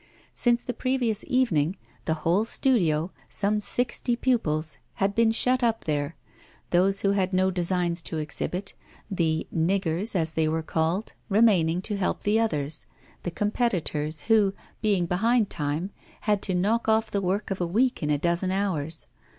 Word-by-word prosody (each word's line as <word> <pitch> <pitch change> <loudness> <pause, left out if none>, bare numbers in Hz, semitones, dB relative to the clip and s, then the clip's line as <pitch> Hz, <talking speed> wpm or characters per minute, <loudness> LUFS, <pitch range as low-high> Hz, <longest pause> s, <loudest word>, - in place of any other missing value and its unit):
Since 240 -1 +2
the 245 - -4
previous 245 -4 +1
evening, 195 - +1 0.3
the 160 - 0
whole 180 +6 +3
studio, 180 - +1 0.2
some 210 +1 +1
sixty 240 +3 +1
pupils, 155 - 0 0.2
had 200 +1 0
been 230 +1 +3
shut 250 +3 +2
up 230 -2 +1
there; 145 0 -2 0.6
those 195 +3 +3
who 200 - +2
had 195 -1 0
no 185 +1 +2
designs 175 -1 0
to 160 - -4
exhibit 155 +5 -3 0.4
'the 160 -4 0
niggers,' 180 +4 +1
as 165 -3 +2
they 160 0 +1
were 160 +1 -1
called 165 +6 -1 0.2
remaining 190 -6 +3
to 205 0 -1
help 195 - -1
the 210 +2 +2
others, 150 -9 -1 0.3
the - - -3
competitors 170 -7 -1
who, 205 0 +3 0.3
being 200 -5 +2
behind 215 +5 +1
time, 150 +5 -2 0.3
had 210 -2 +1
to 185 - -1
knock 220 +6 +1
off 220 0 +2
the 200 - 0
work 195 +2 -1
of 195 - -2
a 175 - 0
week 240 +8 +1
in 150 - -1
a 150 - +2
dozen 170 +4 0
hours. 170 -6 -2
190 Hz, 160 wpm, -26 LUFS, 165-220 Hz, 0.6 s, whole